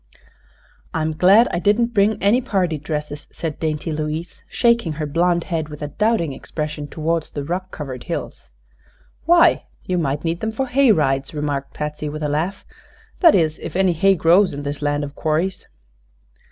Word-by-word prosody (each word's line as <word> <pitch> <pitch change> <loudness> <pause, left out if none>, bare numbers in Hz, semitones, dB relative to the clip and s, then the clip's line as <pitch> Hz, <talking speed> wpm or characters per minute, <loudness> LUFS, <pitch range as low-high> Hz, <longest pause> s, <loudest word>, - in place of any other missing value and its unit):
"I'm 160 -1 0
glad 195 +8 +5
I 170 - -1
didn't 225 +6 +2
bring 210 0 +2
any 220 +6 +4
party 185 - -1
dresses," 150 0 -5
said 160 -3 -5
dainty 155 0 -2
Louise, 155 +2 -4
shaking 235 -9 +2
her 150 0 -3
blonde 170 +3 +1
head 160 -3 -3
with 150 0 -8
a 145 - -3
doubting 210 -3 0
expression 150 +1 -5
toward 165 +3 -1
the 145 -2 -7
rock 180 +5 -3
covered 130 -7 -7
hills. - - -6 0.8
"Why, - - +5 0.2
you 180 -1 0
might 145 -2 -1
need 165 0 -1
them 220 0 -3
for 265 +4 -1
hay 260 0 +4
rides," 135 -5 +1
remarked 145 -2 -3
Patsy, 150 0 -4
with 155 +1 -6
a 150 - 0
laugh; 170 +7 -2 0.5
"that 335 -4 +7
is, 160 -4 +1
if - - -7
any 190 -1 +3
hay 195 +4 +3
grows 175 +1 +4
in 145 - -6
this 145 +1 -4
land 145 0 0
of 145 0 -6
quarries." 160 +6 -1
160 Hz, 175 wpm, -21 LUFS, 150-190 Hz, 0.8 s, that